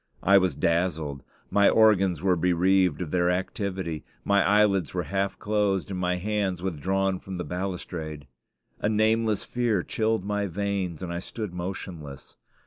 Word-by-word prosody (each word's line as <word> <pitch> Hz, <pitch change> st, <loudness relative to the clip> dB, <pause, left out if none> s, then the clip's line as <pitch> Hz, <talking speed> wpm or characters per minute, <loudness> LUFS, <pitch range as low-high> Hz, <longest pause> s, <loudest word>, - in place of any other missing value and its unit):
I 100 Hz, +1 st, +6 dB
was 90 Hz, -6 st, 0 dB
dazzled. 80 Hz, -3 st, 0 dB, 0.3 s
My 100 Hz, -1 st, +5 dB
organs 95 Hz, -7 st, +4 dB
were 95 Hz, -2 st, +3 dB
bereaved 90 Hz, -1 st, +2 dB
of 75 Hz, -, -8 dB
their 90 Hz, -1 st, +2 dB
activity. 90 Hz, -3 st, -2 dB, 0.2 s
My 100 Hz, 0 st, +4 dB
eyelids 100 Hz, -6 st, +3 dB
were -, -, 0 dB
half 100 Hz, 0 st, -2 dB
closed, 105 Hz, -3 st, 0 dB
and 95 Hz, -, -3 dB
my 90 Hz, 0 st, +1 dB
hands 100 Hz, -1 st, -1 dB
withdrawn 95 Hz, +2 st, 0 dB
from 95 Hz, -1 st, -7 dB
the 90 Hz, -, -3 dB
balustrade. 85 Hz, -5 st, -5 dB, 0.5 s
A 105 Hz, -, 0 dB
nameless 110 Hz, 0 st, +2 dB
fear 115 Hz, -7 st, 0 dB
chilled 110 Hz, -3 st, -1 dB
my 105 Hz, 0 st, -1 dB
veins, 95 Hz, -2 st, -3 dB
and 85 Hz, -1 st, -4 dB
I 85 Hz, -, -2 dB
stood 105 Hz, +1 st, -6 dB
motionless. 85 Hz, -5 st, -7 dB
95 Hz, 150 wpm, -26 LUFS, 90-100 Hz, 0.5 s, I